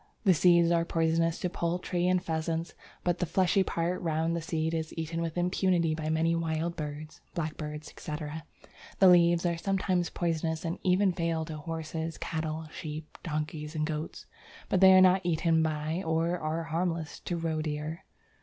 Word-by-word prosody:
The 190 Hz, -4 st, +6 dB
seeds 170 Hz, 0 st, +5 dB
are 170 Hz, -1 st, +3 dB
poisonous 165 Hz, 0 st, +1 dB
to 180 Hz, -, 0 dB
poultry 175 Hz, 0 st, -1 dB
and 185 Hz, 0 st, +3 dB
pheasants, 165 Hz, -1 st, -2 dB, 0.3 s
but 175 Hz, -1 st, 0 dB
the 180 Hz, -, 0 dB
fleshy 185 Hz, +3 st, +3 dB
part 175 Hz, 0 st, -1 dB
round 165 Hz, 0 st, 0 dB
the 170 Hz, -, -2 dB
seed 160 Hz, -2 st, -1 dB
is 160 Hz, -1 st, -3 dB
eaten 165 Hz, +1 st, -3 dB
with 165 Hz, 0 st, -3 dB
impunity 175 Hz, -2 st, +2 dB
by 155 Hz, 0 st, -3 dB
many 160 Hz, +1 st, +2 dB
wild 165 Hz, 0 st, -1 dB
birds 150 Hz, -1 st, -6 dB
(blackbirds, 150 Hz, -2 st, -4 dB
etc.). 150 Hz, 0 st, -6 dB, 0.5 s
The 190 Hz, -, +6 dB
leaves 175 Hz, -1 st, +5 dB
are 170 Hz, -1 st, +1 dB
sometimes 185 Hz, -2 st, 0 dB
poisonous 165 Hz, -1 st, -2 dB
and 170 Hz, +3 st, -3 dB
even 185 Hz, +1 st, +3 dB
fatal 165 Hz, -2 st, -1 dB
to 155 Hz, -1 st, -6 dB
horses, 160 Hz, +1 st, -4 dB
cattle, 160 Hz, -1 st, -3 dB
sheep, 155 Hz, -1 st, -7 dB
donkeys, 150 Hz, 0 st, -4 dB
and 155 Hz, 0 st, 0 dB
goats, 155 Hz, 0 st, -5 dB, 0.4 s
but 185 Hz, -, +2 dB
they 190 Hz, 0 st, +9 dB
are 185 Hz, -, +8 dB
not 185 Hz, 0 st, +6 dB
eaten 165 Hz, -1 st, +2 dB
by 155 Hz, +2 st, -1 dB
or 165 Hz, +2 st, +1 dB
are 155 Hz, +1 st, -2 dB
harmless 165 Hz, -1 st, -2 dB
to 175 Hz, -, -2 dB
roedeer. 155 Hz, -1 st, -2 dB
165 Hz, 165 wpm, -29 LUFS, 155-175 Hz, 0.5 s, they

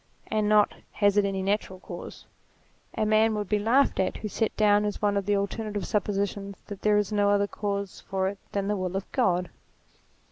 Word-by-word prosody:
and 215 Hz, -1 st, +1 dB
not, 210 Hz, -1 st, +4 dB, 0.2 s
has 205 Hz, -1 st, +3 dB
it 205 Hz, -1 st, +4 dB
any 195 Hz, -1 st, -1 dB
natural 195 Hz, -1 st, -1 dB
cause? -, -, -9 dB, 0.7 s
A 215 Hz, -, +1 dB
man 215 Hz, +1 st, +3 dB
would 210 Hz, -2 st, -2 dB
be 210 Hz, +1 st, +1 dB
laughed 245 Hz, +7 st, +3 dB
at 190 Hz, -, 0 dB
who 215 Hz, -, -5 dB
set 220 Hz, +1 st, -2 dB
down 210 Hz, -1 st, +4 dB
as 210 Hz, -1 st, -2 dB
one 205 Hz, -1 st, +1 dB
of 200 Hz, -1 st, -1 dB
the 205 Hz, -, +3 dB
alternative 205 Hz, +1 st, -2 dB
suppositions 200 Hz, -1 st, -2 dB
that 200 Hz, -2 st, -8 dB
there 210 Hz, -1 st, +3 dB
is 210 Hz, -1 st, 0 dB
no 205 Hz, -1 st, +2 dB
other 205 Hz, 0 st, +3 dB
cause 200 Hz, -1 st, -4 dB
for 190 Hz, -1 st, 0 dB
it 195 Hz, 0 st, -4 dB
than 200 Hz, -1 st, -1 dB
the 210 Hz, -, +1 dB
will 185 Hz, -1 st, -3 dB
of 195 Hz, -, -2 dB
God. 180 Hz, -8 st, +1 dB
205 Hz, 205 wpm, -27 LUFS, 195-210 Hz, 0.7 s, not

